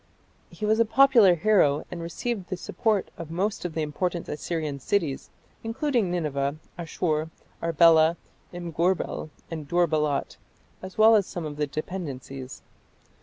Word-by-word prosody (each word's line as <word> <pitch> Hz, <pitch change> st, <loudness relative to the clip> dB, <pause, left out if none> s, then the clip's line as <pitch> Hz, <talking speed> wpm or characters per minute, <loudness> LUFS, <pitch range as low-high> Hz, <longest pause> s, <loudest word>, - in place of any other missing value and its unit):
He 215 Hz, -, -5 dB
was 220 Hz, +1 st, +2 dB
a -, -, +7 dB
popular 230 Hz, -5 st, +6 dB
hero 170 Hz, -6 st, +3 dB
and 175 Hz, -1 st, -5 dB
received 195 Hz, +4 st, -4 dB
the 185 Hz, -, -3 dB
support 215 Hz, 0 st, -1 dB
of 165 Hz, -2 st, -7 dB
most 190 Hz, +4 st, -2 dB
of 165 Hz, -3 st, -4 dB
the 160 Hz, -, 0 dB
important 170 Hz, +3 st, -2 dB
Assyrian 150 Hz, -2 st, -3 dB
cities, 150 Hz, -2 st, -1 dB, 0.3 s
including 235 Hz, -2 st, 0 dB
Nineveh, 145 Hz, -5 st, -1 dB, 0.2 s
Asshur, 160 Hz, -2 st, -2 dB, 0.3 s
Arbela, 165 Hz, 0 st, +5 dB, 0.3 s
Imgurbel, 175 Hz, -1 st, -1 dB, 0.2 s
and 155 Hz, -3 st, -5 dB
Dur 175 Hz, +2 st, +2 dB
balat, 150 Hz, -2 st, -1 dB, 0.4 s
as 185 Hz, -1 st, -9 dB
well 220 Hz, +1 st, +7 dB
as 200 Hz, -3 st, +2 dB
some 175 Hz, -3 st, -5 dB
of 145 Hz, -1 st, -6 dB
the 150 Hz, -1 st, 0 dB
dependencies. 140 Hz, -5 st, -6 dB
170 Hz, 140 wpm, -26 LUFS, 155-195 Hz, 0.4 s, a